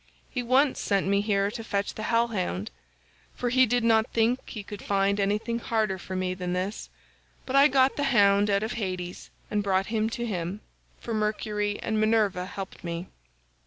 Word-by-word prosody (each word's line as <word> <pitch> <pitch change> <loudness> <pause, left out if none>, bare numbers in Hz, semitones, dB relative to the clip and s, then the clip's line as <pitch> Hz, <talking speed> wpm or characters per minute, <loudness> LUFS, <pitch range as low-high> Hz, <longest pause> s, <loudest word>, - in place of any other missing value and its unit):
He 250 - -2
once 260 +4 +3
sent 200 -1 +1
me 200 +1 +2
here 200 -1 +1
to 230 0 -6
fetch 200 -2 -2
the - - -7
hell 235 0 +3
hound—for 210 +4 -6
he 255 +1 +4
did 245 +1 +1
not 225 -1 +4
think 235 +3 +2
he 210 - -6
could 205 0 -8
find 200 0 +1
anything 210 +4 0
harder 215 -5 -1
for 185 - -6
me 185 0 -1
than 180 -1 -3
this, 185 +4 -3 0.6
but 260 - -3
I 280 +1 +8
got 265 -1 +3
the 285 - +1
hound 205 -5 +4
out 200 +1 +2
of 220 - -2
Hades 185 -5 -4 0.2
and 210 - +1
brought 195 +1 0
him 220 0 +1
to 240 +1 -3
him, 190 -1 -3 0.4
for 230 - -5
Mercury 210 -1 -1
and 220 -1 0
Minerva 215 -4 +2
helped 195 0 -8
me. 170 +1 -5
210 Hz, 185 wpm, -27 LUFS, 195-230 Hz, 0.6 s, I